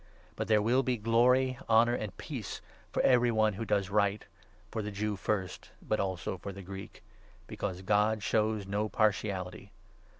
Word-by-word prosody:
But - - -3
there 105 -1 +4
will 125 +4 +3
be 130 -2 0
glory, 125 +4 +3
honour, 115 +1 +5
and 105 -8 -4
peace - - -6 0.3
for - - 0
10 - - +5
every 120 -1 +4
one 110 -1 +2
who 115 +4 -4
does 100 -2 0
right 100 0 +1 0.2
— - - -31
for 110 - -2
the 105 - -4
Jew 105 +1 -2
first, 95 -1 -3
but 110 - -1
also 95 -1 -2
for 100 - -6
the 100 0 -9
Greek, 95 +1 -9 0.4
since 95 -2 -4
God 105 +1 +2
shows 110 -2 +1
no 105 +2 -1
partiality. 100 -4 -1
105 Hz, 175 wpm, -31 LUFS, 100-110 Hz, 0.4 s, honour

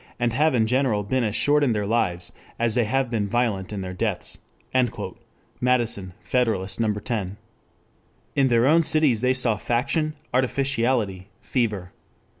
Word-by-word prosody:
and 120 -1 0
have 150 +2 +2
in 110 -2 +3
general 125 -3 +1
been 130 +5 0
as 110 -1 -1
short 145 0 +3
in 125 -5 +2
their 105 -1 -1
lives 90 -6 -1 0.3
as 115 -1 +1
they 120 -1 +3
have 135 +4 0
been 105 -3 -1
violent 110 -5 -1
in 100 -2 -4
their 95 0 -5
deaths." 90 - -2 1.2
Madison, 120 -7 0
Federalist, 110 -7 -1
No. 110 -2 +2
10.] 105 -3 -4 1.0
In 135 -1 +3
their 120 -1 +3
own 160 +4 +5
cities 150 -8 +3
they 130 +1 +2
saw 120 -4 +3
faction, 145 - -1 0.2
artificiality, 125 -7 0
fever. 105 -8 -2
120 Hz, 150 wpm, -24 LUFS, 105-130 Hz, 1.2 s, own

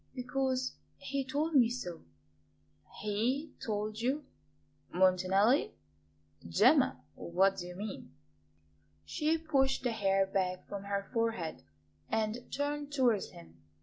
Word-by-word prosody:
"Because 260 0 -1 0.2
he 280 -1 -2
told 290 +5 -1
me 245 -5 +6
so." 180 -9 -5 1.0
"HE 245 +9 0
told 215 0 -2
you? 270 +4 0 0.7
Montanelli? 185 - +3 0.7
Gemma, 85 - +4
what 190 +3 +2
do 175 - -5
you 180 - -8
mean?" 205 +2 -6 0.9
She 310 +2 +1
pushed 270 -5 +1
the 245 - +1
hair 195 -3 +2
back 185 -1 -1
from 200 -1 -6
her 200 0 -2
forehead 225 -9 -1 0.5
and 220 +2 -2
turned 290 0 -2
towards 245 -8 +2
him. 80 -1 -15
225 Hz, 115 wpm, -32 LUFS, 195-270 Hz, 1.0 s, me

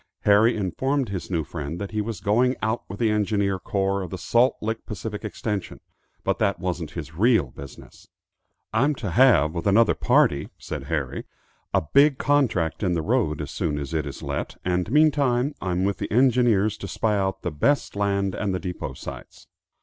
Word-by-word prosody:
Harry 110 +3 +4
informed 130 - -1
his 95 -3 -5
new 85 -4 0
friend 75 +2 -6
that 100 -1 -5
he 110 -1 -1
was 105 -3 -5
going 125 +5 +2
out 110 +1 0
with 100 - -6
the 110 -1 +2
engineer 100 -2 0
corps 100 +1 -1
of 90 - -5
the 95 - -5
Salt 120 +7 +2
Lick 110 +1 -3
Pacific 105 0 -5
Extension, 105 -1 -4 0.4
but - - 0
that 100 -2 +1
wasn't 90 -4 -3
his 80 -1 -6
real 105 - +2
business. 70 +1 -12 0.7
"I'm 140 +7 +2
to 105 -8 -4
have, 90 - +5
with 85 +2 -3
another 105 +2 +5
party," 70 +1 +2
said - - -6
Harry, - - -3 0.5
"a - - +2
big 140 - +4
contract 120 - +1
in 90 -4 +1
the 85 -2 -1
road, 105 - 0
as 75 - -6
soon 75 -3 -2
as 70 +1 -5
it 80 -2 -1
is - - -8
let; - - -4
and, 90 +1 0
meantime, 145 -3 +3
I'm 90 -1 -1
with 100 0 -1
the - - -4
engineers 120 -4 +3
to 100 - -7
spy 105 +3 0
out 95 -1 -1
the 90 - -2
best 135 - 0
land 100 -1 0
and 100 -2 -2
the - - -2
depot 90 -1 -5
sites." - - -10
100 Hz, 190 wpm, -24 LUFS, 90-115 Hz, 0.7 s, have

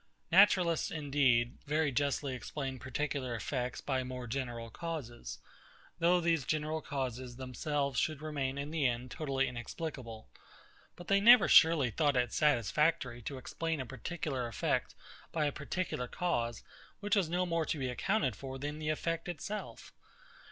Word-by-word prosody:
Naturalists 180 -3 +5
indeed 135 -6 +2
very 150 0 +1
justly 140 0 0
explain 130 +1 -5
particular 130 0 -2
effects 125 +3 -3
by 130 -2 -1
more 125 -1 -6
general 120 -2 -4
causes, 120 - -6 0.6
though 175 +2 +4
these 165 -4 +2
general 155 +3 -1
causes 130 -3 -4
themselves 135 +1 -2
should 155 -3 0
remain 140 -3 -2
in 140 +2 -4
the 155 -4 +2
end 120 +1 -3
totally 135 -3 0
inexplicable; 120 -2 -6 0.7
but 175 - -11
they 200 0 +4
never 240 +4 +8
surely 160 -7 +6
thought 145 +1 +2
it 120 -2 +1
satisfactory 145 -1 +2
to 135 +4 -5
explain 160 +4 -3
a 130 - -3
particular 135 0 -4
effect 115 - -1 0.4
by 155 -2 0
a 145 - +1
particular 150 -3 -3
cause, 120 -8 -1 0.4
which 205 +1 +1
was 190 -6 +2
no 180 +2 +1
more 165 -2 0
to - - -1
be 130 -2 -2
accounted 130 - 0
for 135 -1 -7
than 145 +3 -4
the 155 0 -2
effect 165 +2 -1
itself. 190 +6 -6
140 Hz, 150 wpm, -33 LUFS, 125-160 Hz, 0.7 s, never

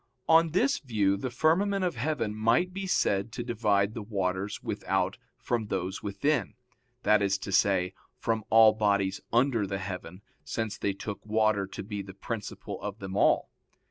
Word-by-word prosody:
On 165 0 +6
this 250 - +2
view 105 -7 +1
the 125 +6 -3
firmament 185 +9 +2
of 175 - -1
heaven 125 -3 -1
might 115 +12 +2
be 195 0 -4
said 100 - +1
to 120 - -4
divide 105 -4 +1
the 115 - -5
waters 100 -1 -2
without - - -1 0.2
from 115 -3 -2
those 95 -1 -3
within 105 +2 -1 0.5
that 105 -1 +4
is 100 -1 +2
to 100 - -6
say, 95 -1 +2 0.2
from 110 -1 -1
all 110 -1 +7
bodies 100 -3 +1
under 120 -3 +2
the 100 0 -2
heaven, 95 -1 -7 0.2
since 110 -2 -3
they 100 - -1
took 100 +1 -6
water 110 -2 +1
to - - -7
be 105 0 -5
the 95 -1 -10
principle 105 +1 -6
of 105 0 -5
them 95 -2 -6
all. - - +3
105 Hz, 170 wpm, -29 LUFS, 100-120 Hz, 0.5 s, all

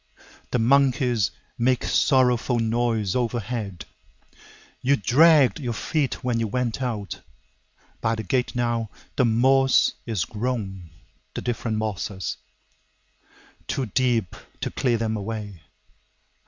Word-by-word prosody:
The - - 0
monkeys 125 -3 +3 0.3
make 125 +1 +2
sorrowful 125 -2 +2
noise 115 -3 0
overhead. 115 -5 -3 1.0
You 135 +2 +3
dragged 140 - +5
your 120 -5 -3
feet 145 -1 -1
when 120 -2 0
you 115 - 0
went 125 +3 -2
out. 105 -8 -4 0.8
By 115 0 +1
the 110 - -4
gate 125 +7 -1
now, 120 -2 0 0.3
the 125 - +3
moss 130 +3 +4
is 110 -7 -1
grown, 105 -6 -4 0.5
the - - -3
different 115 -2 -2
mosses, 100 -3 -3 1.3
Too 135 - -1
deep 115 -3 0 0.3
to - - -2
clear 120 -3 +1
them 110 -1 -1
away! 105 -4 -5
120 Hz, 115 wpm, -24 LUFS, 110-125 Hz, 1.3 s, dragged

